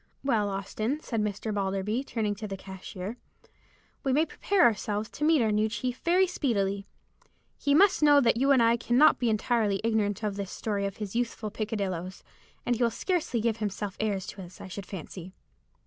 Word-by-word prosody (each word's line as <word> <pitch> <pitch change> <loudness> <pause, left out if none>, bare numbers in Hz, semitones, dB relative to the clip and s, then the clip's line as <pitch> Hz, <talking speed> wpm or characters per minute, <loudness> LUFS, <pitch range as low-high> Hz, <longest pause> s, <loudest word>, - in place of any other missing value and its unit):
"Well, 220 -7 +1
Austin," 215 +7 -2
said 230 -7 -2
Mr. 210 +1 -2
Balderby, 200 +4 -1
turning 220 -6 -1
to 210 +1 -6
the 195 -1 -5
cashier, 190 +3 -7 0.9
"we 270 - +1
may 300 +5 +3
prepare 390 +2 +1
ourselves 210 - +1
to 300 - -5
meet 310 -4 +4
our 220 - +2
new 215 +1 +2
chief 245 +4 -3
very 360 +3 +3
speedily. 200 - -1 0.7
He 285 0 +2
must 385 +2 +5
know 290 -1 +7
that 235 -4 +3
you 270 +4 +2
and 265 -4 +6
I 230 +1 +4
cannot 245 +5 +4
be 240 -2 +1
entirely 215 -2 +1
ignorant 220 -2 0
of 205 -2 -2
the 200 -1 -3
story 200 +1 -2
of 195 - -7
his 210 -1 -6
youthful 230 -3 -2
peccadilloes, 195 -4 -3 0.4
and 245 - +2
he 240 - -5
will 235 - +4
scarcely 300 - -1
give 230 -1 0
himself 205 -2 -3
airs 200 -3 -1
to 195 - -8
us, 180 0 -11
I - - -8
should 190 +1 -7
fancy." 185 0 -8
215 Hz, 190 wpm, -28 LUFS, 200-245 Hz, 0.9 s, know